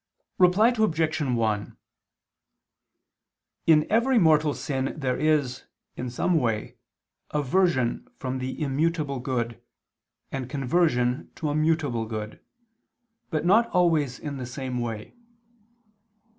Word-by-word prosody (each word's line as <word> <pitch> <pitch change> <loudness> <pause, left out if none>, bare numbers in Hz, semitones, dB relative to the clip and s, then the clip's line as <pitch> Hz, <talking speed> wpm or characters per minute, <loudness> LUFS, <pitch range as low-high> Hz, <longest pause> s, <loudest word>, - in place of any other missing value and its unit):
Reply 195 +7 +5
Obj. 160 -7 +1
1: 115 -6 -1 1.9
In 155 -2 +5
every 235 +4 +3
mortal 155 -5 +4
sin 135 -2 -3
there 130 -4 -1
is, 145 -5 +1 0.3
in 125 - -4
some 160 +7 +1
way, 115 -5 -2 0.5
aversion 150 - +1
from 130 0 -3
the 130 +1 -4
immutable 150 -1 0
good, 120 -2 -3 0.7
and 130 -2 -4
conversion 135 -3 +1
to 155 - -3
a 145 - -1
mutable 155 -7 +1
good, 110 -1 -6 0.9
but 155 -2 -2
not 225 +6 +4
always 160 -8 +2
in 145 -2 -6
the 125 -2 -5
same 130 0 -4
way. 115 -3 -5
145 Hz, 110 wpm, -26 LUFS, 125-165 Hz, 1.9 s, Reply